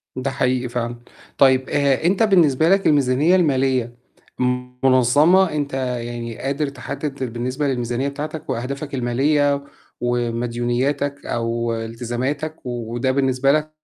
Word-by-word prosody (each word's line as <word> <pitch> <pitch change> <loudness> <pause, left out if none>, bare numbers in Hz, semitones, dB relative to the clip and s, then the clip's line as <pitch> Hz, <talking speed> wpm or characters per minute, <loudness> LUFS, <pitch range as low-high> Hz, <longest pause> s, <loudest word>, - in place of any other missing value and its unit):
ده 130 +1 -2
حقيقي 125 -1 0
فعلًا، 120 0 -3 0.4
طيب 130 -1 +4
آآ، 140 0 +1
أنت 190 +5 +3
بالنسبة 165 -7 +4
لك 195 +1 +3
الميزانية 145 +4 +3
المالية 130 -7 +1 0.9
مُنظَّمة، 145 +9 +4
أنت 145 -2 -2
يعني 120 -3 -4
قادر 140 +2 -2
تحدِّد 135 -1 -5
بالنسبة 130 +5 -2
للميزانية 125 0 -1
بتاعتك 150 +3 -6
وأهدافك 140 +5 -4
المالية 140 +3 +1 0.4
ومديونياتك 120 +4 -1
أو 115 0 -1
التزاماتك، 120 +7 -3
وده 120 +1 -2
بالنسبة 135 0 +2
لك 155 +1 0
130 Hz, 110 wpm, -21 LUFS, 120-145 Hz, 0.9 s, طيب